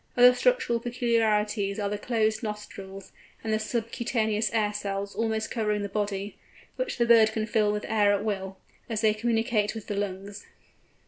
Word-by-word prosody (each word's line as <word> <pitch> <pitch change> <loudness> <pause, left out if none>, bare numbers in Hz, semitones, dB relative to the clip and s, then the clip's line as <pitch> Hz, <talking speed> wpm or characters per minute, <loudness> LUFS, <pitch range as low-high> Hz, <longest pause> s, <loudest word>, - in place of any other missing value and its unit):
Other 245 0 +8
structural 460 - +2
peculiarities 225 -4 0
are 205 - 0
the 205 0 -3
closed 220 -2 0
nostrils, 195 -3 -7 0.3
and 220 -1 -1
the 215 - +2
subcutaneous 220 -1 -1
air 210 -2 +1
cells 200 -1 -3
almost 220 +1 -1
covering 210 -3 0
the 200 - -3
body, 205 0 -3 0.4
which - - -3
the 235 - +3
bird 225 -2 +6
can 215 -1 -1
fill 210 -1 +2
with 210 0 -3
air 210 -2 +3
at 205 +1 0
will, 190 -2 -3 0.3
as 220 -2 -1
they 215 -1 +4
communicate 225 -1 0
with 220 - -7
the 205 - -4
lungs. 200 +1 -5
215 Hz, 170 wpm, -27 LUFS, 205-225 Hz, 0.4 s, Other